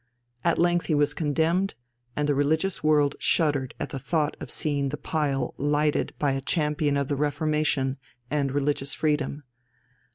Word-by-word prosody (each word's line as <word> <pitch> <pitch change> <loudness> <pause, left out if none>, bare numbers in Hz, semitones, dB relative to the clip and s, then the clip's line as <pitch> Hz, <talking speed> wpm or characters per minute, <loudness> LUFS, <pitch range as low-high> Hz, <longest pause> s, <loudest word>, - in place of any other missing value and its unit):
At 170 - +2
length 175 0 +2
he 155 - +2
was 145 0 +2
condemned, 165 +6 +1 0.4
and 150 0 0
the 145 - +3
religious 155 +7 +1
world 150 -2 +4
shuddered 145 -5 +1
at - - -3
the 135 - -5
thought 155 +2 0
of - - -7
seeing 140 -3 0
the 150 - -4
pile 145 -4 -1
lighted 145 +1 +1
by 145 -2 +1
a 135 0 -1
champion 150 -1 0
of 140 -1 0
the 145 - 0
Reformation 150 -2 0 0.3
and 140 0 0
religious 145 0 -1
freedom. 150 -1 -1
150 Hz, 160 wpm, -26 LUFS, 140-155 Hz, 0.4 s, world